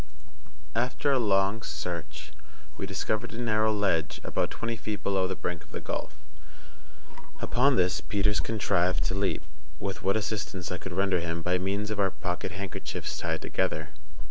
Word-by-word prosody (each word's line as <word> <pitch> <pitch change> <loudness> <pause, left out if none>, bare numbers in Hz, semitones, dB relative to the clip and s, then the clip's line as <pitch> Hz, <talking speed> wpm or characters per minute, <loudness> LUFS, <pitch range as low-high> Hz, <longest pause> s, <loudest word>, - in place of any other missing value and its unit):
After 125 +4 +2
a 135 - +4
long 100 -1 +3
search 75 -2 -4 0.4
we 95 - -3
discovered 105 +3 -1
a - - -6
narrow 110 -2 +3
ledge 95 -8 +1
about - - 0
twenty 115 0 -2
feet 105 -2 -4
below 95 -2 +2
the 95 - -2
brink 90 -2 -3
of - - -21
the - - -4
gulf; 75 - -4 1.2
upon 135 +2 +4
this 90 -1 +3
Peters 105 0 +2
contrived 95 -5 +2
to - - 0
leap, 95 0 +1 0.4
with 100 -1 -3
what 100 +2 +3
assistance 100 -4 -2
I 90 - -2
could 95 - -5
render 95 0 +3
him 85 0 -2
by 90 +1 +2
means 100 +3 -1
of 105 - -2
our 95 -1 +4
pocket 90 -1 -3
handkerchiefs 100 +1 -4
tied - - -1
together. - - 0
95 Hz, 165 wpm, -29 LUFS, 90-110 Hz, 1.2 s, a